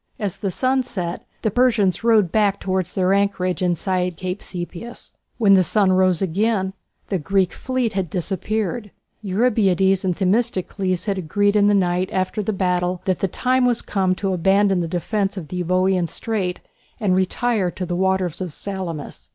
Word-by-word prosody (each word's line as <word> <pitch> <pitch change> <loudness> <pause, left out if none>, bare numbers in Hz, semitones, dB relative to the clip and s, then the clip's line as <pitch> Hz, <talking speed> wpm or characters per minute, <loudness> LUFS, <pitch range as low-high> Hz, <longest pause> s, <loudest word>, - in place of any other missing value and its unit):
As 205 -7 -3
the 200 -1 -2
sun 260 +7 +1
set 180 -8 -4 0.2
the 220 - +1
Persians 220 -6 +2
rowed 220 -7 +4
back 205 -2 +2
towards 185 -2 -2
their 185 0 +2
anchorage 195 -3 0
inside 180 0 0
Cape 185 +2 -4
Sepias. 180 +6 -7 0.2
When 205 -4 +5
the 190 -1 +6
sun 195 +2 +2
rose 185 -1 +3
again 190 +1 0 0.4
the 190 - 0
Greek 190 +2 +1
fleet 255 -3 -2
had 190 -3 -2
disappeared. 205 +5 -2 0.3
Eurybiades 195 -3 +2
and 185 -2 0
Themistocles 190 -3 0
had 200 -3 -1
agreed 205 +5 +1
in 205 -1 +4
the 205 - +4
night 180 -1 +1
after 190 +1 -1
the 210 - -1
battle 180 -2 -1
that 185 -2 0
the 195 - +1
time 255 +7 +1
was 245 -2 +1
come 190 -2 0
to 195 0 -1
abandon 195 +2 +3
the 170 - -1
defence 195 +4 -1
of 165 -5 -6
the 180 - -4
Euboean 185 0 +1
Strait 195 -3 -3 0.4
and 195 -4 +2
retire 190 +1 +1
to 180 +1 -5
the 175 0 -3
waters 190 -2 0
of 180 -3 -3
Salamis. 180 -4 -6
190 Hz, 170 wpm, -21 LUFS, 180-205 Hz, 0.4 s, the